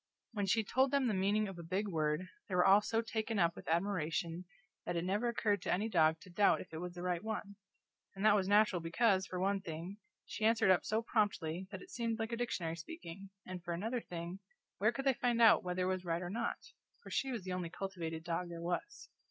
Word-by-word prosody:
When 205 -4 -2
she 220 +4 +3
told 260 +6 +2
the 280 +1 +3
meaning 210 -3 +1
of 190 -3 -7
a - - -5
big 185 +5 -2
word 155 0 0 0.2
they 185 - -1
were 180 - +4
all 195 +2 +7
so 225 +2 0
taken 220 0 -2
up 170 -2 +3
with - - -11
admiration 170 -1 -1 0.4
that 175 - -3
it 170 - 0
never 205 +6 0
occurred 210 -4 +1
to - - -2
any 210 +5 +1
dog 160 -4 +4
to 185 - -13
doubt 200 +3 +4
if 185 - -10
it 160 - -4
was 180 0 -6
the 175 - -6
right 180 0 -1
one; 215 -2 -4 0.6
and 195 +2 -2
that 215 - +7
was 195 -2 +2
natural, 205 -2 +4
because, 190 +3 +2
for 180 - -4
one 195 +1 +1
thing, 170 +3 -6 0.3
she - - -6
answered 220 -3 +5
up 185 - +4
so 220 +2 0
promptly 190 -6 0
that - - -7
it 370 - -15
seemed 230 -2 -1
like 225 0 -3
a 235 - -2
dictionary 175 -9 -2
speaking, 195 - -9 0.2
and 180 -1 -7
for 170 0 -2
another 225 +7 -2
thing, 175 +1 -6 0.4
where - - +4
could 270 - -5
they 270 - +5
find 240 -1 0
out 230 -2 +7
whether 180 0 -1
it 185 +1 +1
was 185 -1 -4
right 170 0 -1
or 175 - -4
not? 230 +3 -1 0.5
for - - -10
she 270 - 0
was 230 -6 -4
the 185 0 -4
only 180 -2 -3
cultivated 165 -4 -5
dog 175 +1 -2
there 170 -1 -6
was. 175 - -4
190 Hz, 235 wpm, -35 LUFS, 175-220 Hz, 0.6 s, all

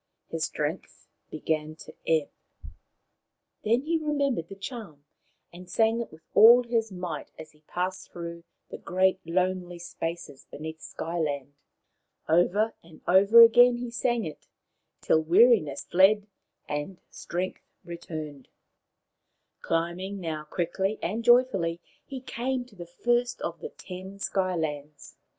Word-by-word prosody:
His 165 0 -1
strength 150 +4 -5 0.2
began 155 0 -2
to - - -12
ebb. 160 -3 +1 1.3
Then 230 +4 +2
he 325 +3 0
remembered 280 - -1
the 195 - -8
charm, 195 - -8 0.5
and 180 +1 -12
sang 225 +4 +2
it 235 - -7
with 155 0 -16
all 235 +4 +8
his 230 -2 -1
might 180 -4 -5
as 155 0 -10
he 150 - -27
passed 185 +1 -4
through 170 -1 -7 0.3
the - - -7
great 185 +1 +1
lonely 180 0 -1
spaces 170 -3 -6
beneath 160 +1 -8
Sky 170 +1 -5
land. 145 -3 -2 0.7
Over 180 +7 +3
and 165 -2 -17
over 200 +6 +8
again 245 +1 +6
he 240 -1 -5
sang 240 -1 0
it, 155 - -9 0.5
till 160 - +3
weariness 165 - +4
fled 200 +3 +4 0.4
and 150 +5 -4
strength 180 +2 -4 0.2
returned. 155 -5 -7 1.1
Climbing 175 +4 -2
now 160 -4 -4
quickly 190 +6 -2
and 220 +6 -2
joyfully, 215 -9 +3 0.2
he 265 -2 -8
came 255 0 -3
to 235 -4 -20
the 175 -2 -9
first 240 +7 0
of 170 0 -4
the - - -6
ten 185 +1 -10
Sky 190 -2 -1
lands. 150 -2 -5
180 Hz, 130 wpm, -27 LUFS, 160-225 Hz, 1.3 s, all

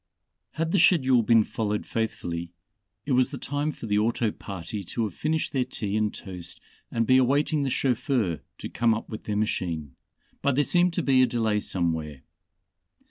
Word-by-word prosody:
Had 165 +1 -1
the 195 - +3
schedule 130 -8 +5
been 115 0 +5
followed 105 -1 -2
faithfully, 85 -6 -3 0.5
it 145 - -3
was 130 0 +4
the 140 - -6
time 145 +4 -2
for 120 - -9
the 105 -1 +2
auto 115 0 +1
party 100 +1 -6
to 115 +6 -3
have 105 -5 -3
finished 155 - -1
their 130 -2 +2
tea 105 -5 -3
and 110 -1 +1
toast 90 -3 -7 0.3
and 115 -1 0
be 130 +2 +5
awaiting 145 +4 +2
the 140 - 0
chauffeur 125 - 0 0.2
to - - -6
come 115 -2 +2
up 110 - -6
with 110 - -7
their 105 -1 -1
machine, 85 -9 -2 0.5
but 140 -2 +2
there 145 - +3
seemed 175 +2 +3
to - - -1
be 130 -2 +4
a 130 - +5
delay 110 -3 +1
somewhere. 80 -8 -2
115 Hz, 185 wpm, -26 LUFS, 100-135 Hz, 0.5 s, schedule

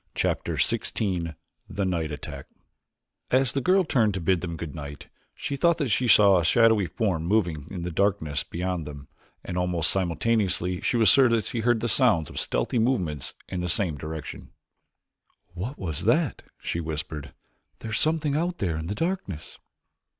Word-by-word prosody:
Chapter - - 0
XVI 85 -7 -1 0.3
The 100 +2 -2
Night 85 -4 -1
Attack 70 -1 -7 0.8
As 130 0 +3
the 140 - 0
girl 185 +6 +4
turned 110 - +2
to - - -1
bid 90 0 +1
them 85 -2 -4
good 80 -2 -6
night, 70 -2 -8 0.3
she 140 0 -3
thought 170 +4 +3
that 145 -5 -1
she 120 +4 +1
saw 100 -4 +7
a - - 0
shadowy 110 +1 +4
form 85 -1 -1
moving 85 -6 0
in 90 -3 -5
the 90 - -3
darkness 80 -6 0
beyond 90 -2 -3
them, 70 -1 -9 0.4
and 90 - -2
almost 90 -3 +2
simultaneously 90 0 0
she 120 - +1
was 110 -2 +4
sure 135 -3 +6
that 115 -2 +1
she 120 - -3
heard 115 0 +2
the 120 - 0
sounds 110 - +3
of - - -4
stealthy 120 - 0
movement 90 - 0
in 90 -1 -3
the 90 - -2
same 85 -3 +1
direction. 75 +2 -7 1.0
"What 105 +11 -5
is 80 -7 -4
that?" - - +2 0.2
she 85 - -3
whispered. 75 -3 -5 0.4
"There 110 - -7
is 110 - 0
something 155 -2 +1
out 175 +3 -1
there 85 -5 -1
in 80 +1 -4
the 100 - -3
darkness." 165 - -4
95 Hz, 175 wpm, -26 LUFS, 80-115 Hz, 1.0 s, saw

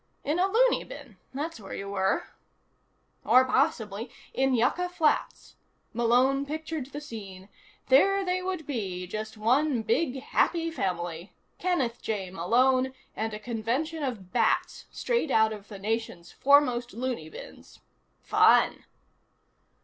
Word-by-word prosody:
In 305 +5 0
a 375 - +4
loony 475 +5 +3
bin, 275 -9 -11
that's 290 0 -4
where 195 - -8
you 200 - -6
were. 190 -1 +1 1.0
Or, 255 +1 +5
possibly, 245 -5 0 0.2
in 265 -1 +2
Yucca 280 +10 +1
Flats. 325 -4 -1 0.4
Malone 250 +4 +3
pictured 310 -1 -5
the 285 +1 -7
scene: 200 -8 -9 0.4
there 390 +9 +5
they 365 0 0
would 365 -4 -4
be, 195 -10 -4
just 215 +4 -6
one 250 +3 +2
big 255 +4 0
happy 330 +5 0
family. 175 - -3 0.3
Kenneth 270 -11 -1
J. 195 -4 -3
Malone, 255 +8 +2 0.2
and 220 +1 -2
a - - -7
convention 245 +9 -2
of 225 -10 -4
bats - - +1
straight 470 - -1
out 220 -3 +3
of 210 -1 -10
the 205 - -9
nation's 205 -4 -3
foremost 255 -4 +3
loony 240 -10 -4
bins. - - -12 0.4
Fun! - - +4
250 Hz, 130 wpm, -28 LUFS, 215-295 Hz, 1.0 s, Or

